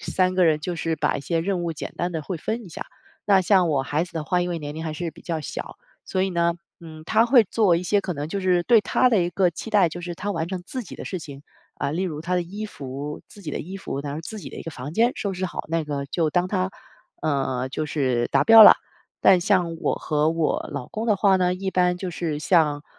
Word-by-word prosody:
3 185 0 0
个 185 -1 +4
人 155 -2 +3
就 175 +2 -4
是 165 -1 -1
把 - - 0
一 140 - -5
些 165 +2 0
任 180 +1 -1
务 170 -1 -2
简 155 - -7
单 175 +1 -2
地 160 - -2
会 175 +4 -5
分 225 +9 -3
一 - - -11
下。 165 - -6 0.4
那 200 -2 +5
像 185 -3 +3
我 135 -3 +1
孩 145 +5 -1
子 175 - -15
的 160 - -3
话， 180 +3 0
因 180 - -2
为 170 - -2
年 145 -1 -6
龄 160 - -5
还 155 - -3
是 170 +1 -4
比 170 - -17
较 165 -2 -3
小， 150 - -7 0.3
所 185 - -1
以 190 - +1
呢， 170 -1 +1 0.3
嗯， 160 -2 -11
他 225 +1 +4
会 240 -1 +6
做 200 -3 +2
一 170 - -2
些 200 +3 +2
可 185 - -3
能 145 -1 -5
就 200 - -3
是 180 -2 +2
对 235 +1 +6
他 250 +5 +3
的 220 -7 +3
一 175 - -1
个 185 0 +2
期 220 +6 -8
待， 200 -5 +4
就 175 - -7
是 175 0 -5
他 205 +4 -4
完 160 -5 -2
成 185 0 -5
自 255 +6 -5
己 195 - -10
的 - - -7
事 185 - -4
情。 140 -2 -10 0.3
啊， - - -2
例 170 +6 -2
如 155 -5 -4
他 180 +3 -1
的 180 - +1
衣 200 +5 -6
服， 140 -3 -7
自 205 - -15
己 155 - -5
的 - - -3
衣 185 +5 -7
服， 140 -7 -5
然 140 0 -5
后 155 - -5
自 215 +6 -7
己 - - -8
的 - - -11
一 - - -7
个 165 - -6
房 140 +2 -7
间 235 +5 +3
收 200 - -2
拾 185 +1 -3
好， 180 - -4
那 165 0 0
个 145 -2 -4
就 160 +1 0
当 180 +3 +1
他， 185 0 -1 0.5
呃， 135 -4 -1
就 145 +4 -3
是 130 -6 0
达 - - +3
标 225 -1 +10
了。 - - +11 0.5
但 185 -2 +6
像 180 -3 +1
我 - - +1
和 150 0 0
我 165 -1 -1
老 140 -4 -5
公 220 - -5
的 215 - +3
话 195 -1 +4
呢， 180 -1 +2
一 190 +1 -3
般 180 -1 +2
就 180 0 -5
是 165 -3 -3
像， 150 -3 +2
175 Hz, 290 characters per minute, -24 LUFS, 155-190 Hz, 0.5 s, 了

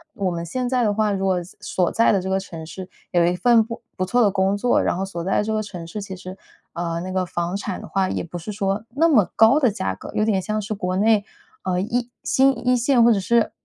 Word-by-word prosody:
我 190 -3 -1
们 170 0 -4
现 250 +9 -2
在 250 -1 +1
的 205 - +2
话， 215 0 +1
如 195 -1 -1
果 185 -2 +1 0.2
所 180 -2 0
在 230 - +3
的 195 - +2
这 190 - -4
个 190 0 +1
城 165 -4 -8
市 185 +3 -8 0.2
有 175 -1 +3
一 175 +1 +1
份 230 +5 +4
不 230 +1 -7 0.2
不 185 - 0
错 245 +6 +2
的 205 -4 +4
工 195 +1 +1
作， 245 +4 +2
然 - - 0
后 190 - -2
所 175 -3 -6
在 190 - +1
的 - - +1
这 220 - -3
个 215 - 0
城 180 -5 -8
市， 210 +5 -6
其 195 -1 -7
实， 185 +1 -9 0.4
呃， 170 -1 -3
那 185 +1 -5
个 185 -1 0
房 175 +1 -3
产 200 -2 -5
的 - - -9
话 190 -1 0
也 - - -2
不 175 +1 -7
是 175 +5 -6
说 195 0 -1
那 305 +7 +3
么 220 - +4
高 225 +5 +6
的 260 -5 +4
价 190 - -2
格， - - -10
有 215 - +2
点 205 -4 +1
像 215 +3 -2
是 210 +2 -4
国 185 -3 -2
内， 215 0 +3 0.4
呃， 180 -1 0
一 240 +4 -2
新 270 -1 +2
一 250 - +5
线 245 0 +3
或 235 - +6
者 205 - 0
是 230 +4 +2
195 Hz, 290 characters per minute, -22 LUFS, 185-225 Hz, 0.4 s, 高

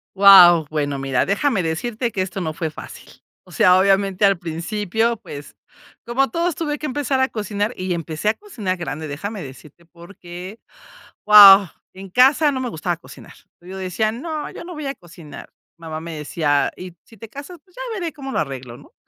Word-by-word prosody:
Guau, 180 -5 +8
bueno, 145 -2 -2
mira, 135 -2 -1
déjame 200 +1 0
decirte 225 +9 -3
que 190 - -2
eso 185 0 -6
no 155 -2 -3
fue 160 0 -4
fácil. - - -12 0.4
O - - -18
sea, 180 0 +4
obviamente, 195 0 +2
al 195 -1 +3
principio, 205 +7 -2
pues, 145 -9 -11 0.5
como 260 +3 0
todos, 340 -1 -1
tuve 300 -2 -3
que - - -6
empezar 270 -1 -2
a 260 - +2
cocinar 210 +1 -3
y 185 0 -3
empecé 165 +3 -3
a - - +2
cocinar 220 - -5
grande. 160 -2 -6
Déjame 195 +7 -6
decirte, 150 +5 -14
porque, 175 +3 -11 0.7
guau, 200 -2 +9 0.3
en 190 +1 -11
casa 275 - +4
no 260 - -3
me 255 -2 -3
gustaba 170 -1 -3
cocinar. 175 - -15 0.3
Yo 185 +2 -10
decía: 190 +4 -2
"No, 305 +5 -5
yo - - -10
no 355 - -9
voy 305 -3 -7
a 275 - -4
cocinar". 165 -4 -13 0.3
Mamá 160 -1 -7
me 165 -1 -7
decía: 145 -1 0
"¿Y 180 -1 -9
si 225 - -19
te 220 +2 -11
casas?, 285 +8 -10
pues 365 -2 -29
ya - - -8 0.2
veré 340 -3 -4
cómo 270 -3 -8
lo - - -1
arreglo, 130 -4 -6
¿no?". 145 - -19
195 Hz, 190 wpm, -20 LUFS, 165-235 Hz, 0.7 s, guau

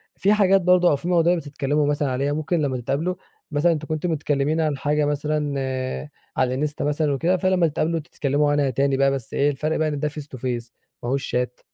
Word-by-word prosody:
في 200 +2 +3
حاجات 195 -2 +4
برضه 180 0 +4
أو - - +3
في 165 - -6
مواضيع 175 0 +3
بتتكلموا 145 -2 -1
مثلًا 145 -2 0
عليها، 140 +3 0
ممكن 155 +2 -1
لما 135 -3 0
تتقابلوا 145 +9 -1 0.4
مثلًا 155 +3 +3
أنتم 155 -2 -3
كنتم 155 +2 -1
متكلمين 150 0 0
عن 155 -3 0
حاجة 150 +2 +1
مثلًا 150 0 -1 0.8
على 130 -1 +2
الانستا 145 +2 -2
مثلًا 150 0 +1
وكده، 170 +7 +1
فلما 185 -1 +2
تتقابلوا 165 +2 -1
تتكلموا 145 -1 0
عنها 145 -2 +2
تاني 135 +2 +1
بقى 135 0 +3
بس 135 -5 -4
إيه 145 +1 +2
الفرق 150 +3 -1
بقى 155 - +1
ان 145 -2 -2
ده 150 +1 0
face 150 +1 -7
to 140 -3 -10
face 120 -1 -3 0.3
ما 120 - -2
هوش 135 +1 -1
شات. 125 0 -2
150 Hz, 210 wpm, -23 LUFS, 140-160 Hz, 0.8 s, حاجات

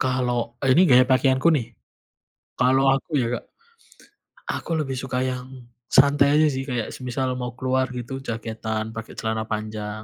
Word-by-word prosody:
Kalau 125 -2 -1 0.2
ini 135 - +6
gaya 125 +1 +7
pakaianku 130 +3 +3
nih? 120 - -2 0.9
Kalau 130 +2 +3
aku 135 - -5
ya 120 - 0
Kak, - - -26 1.1
aku - - -6
lebih 135 -2 -4
suka 130 -1 -4
yang 125 0 -5 0.4
santai 140 +1 +5
aja 155 - +5
sih, 130 - -3
kayak 120 -3 -2
semisal 130 0 -2
mau 125 -1 -4
keluar 130 0 +1
gitu, 120 +2 -6
jaketan 110 -1 -3
pakai 110 - -7
celana 110 0 -2
panjang. 110 0 -4
125 Hz, 150 wpm, -23 LUFS, 115-130 Hz, 1.1 s, gaya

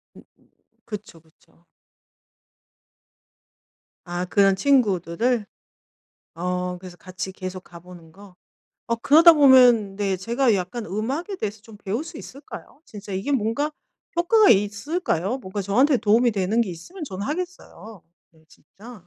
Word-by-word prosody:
음 - - -15 0.6
그쵸, 205 -6 -9
그쵸. 165 +1 -30 2.4
아 175 +1 -4
그런 195 +1 +3
친구들을? 220 - +1 0.9
어 180 +1 -3
그래서 180 -1 -12
같이 185 0 -7
계속 185 0 -7
가 170 -1 -14
보는 175 -2 -15
거. 195 +1 -16 0.5
어 235 -1 -1
그러다 320 +8 +7
보면 250 -8 +5
네 195 -2 -1
제가 235 +4 +1
약간 195 +5 -4
음악에 270 - -4
대해서 210 - -5
좀 220 -2 -14
배울 215 +10 -4
수 325 -1 -10
있을까요? 280 +2 -12
진짜 205 -5 -10
이게 195 +10 -2
뭔가 260 +5 0 0.5
효과가 405 +5 +4
있을까요? 205 - 0
뭔가 200 -3 -6
저한테 255 +9 +3
도움이 230 +3 +3
되는 205 +3 0
게 210 -6 -1
있으면 325 - -10
저는 200 -3 -6
하겠어요. 295 - -7 0.3
네 160 -1 -27
진짜. 230 +5 -16
210 Hz, 270 characters per minute, -23 LUFS, 185-260 Hz, 2.4 s, 그러다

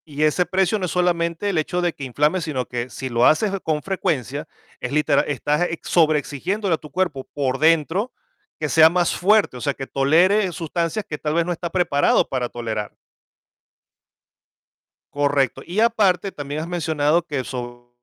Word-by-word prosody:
Y 150 -1 -3
ese 155 +4 +2
precio 190 +2 +1
no 185 - -1
es 180 - -4
solamente 175 +1 0
el 185 - -1
hecho 175 +3 -1
de 175 -1 0
que 140 - -10
inflame, 150 +7 +1
sino 145 -7 -3
que 120 0 -4
si 130 +1 -6
lo 120 0 +2
haces 195 +6 +3
con 155 -2 -1
frecuencia 155 -6 -2 0.3
es 125 - -5
litera 150 +1 +3
estás 150 +4 0
ex 165 - -7
sobreexigiéndole 165 +5 +1
a - - +2
tu 150 - -13
cuerpo 175 -8 -2
por 135 -2 -1
dentro 165 - +2 0.5
que - - -1
sea 160 0 +7
más 175 0 +1
fuerte, 205 -7 +3
o - - -9
sea, 140 +1 0
que 135 0 -7
tolere 180 +8 +3
sustancias 170 +4 -3
que 150 - -5
tal 150 0 -2
vez 170 0 +2
no 180 - -2
está 170 0 -4
preparado 165 -6 +2
para 125 -2 -2
tolerar. 110 -3 -5 2.2
Correcto. 145 -3 +1
Y 185 +6 -1
aparte 200 -5 +2
también 145 0 -5
has 160 - -5
mencionado 160 -2 +1
que 145 -6 -3
sobre 120 -1 -7
160 Hz, 175 wpm, -22 LUFS, 140-180 Hz, 2.2 s, sea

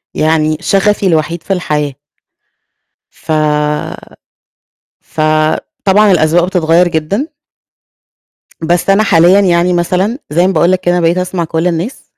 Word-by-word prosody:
يعني، 155 -1 0
شغفي 200 +1 +1
الوحيد 165 0 -1
في 195 - -2
الحياة. 150 -6 -2 1.2
ف - - -9 1.7
فطبعًا، 155 +6 0
الأذواق 170 0 +2
بتتغيّر 175 -1 +1
جدًا. 195 - -3 1.4
بس 175 +2 0
أنا 195 +2 +3
حاليًا 180 0 +4
يعني 180 -2 +1
مثلًا، 185 +8 -1
زي 175 +4 +2
ما 190 - -1
باقول 170 +3 +2
لَك 185 - +1
كده 175 -1 0
أنا 175 - 0
بقيت 170 +2 +1
أسمع 180 -1 -2
كل 165 +2 -2
الناس. 175 +9 -4
175 Hz, 125 wpm, -12 LUFS, 160-190 Hz, 1.7 s, حاليًا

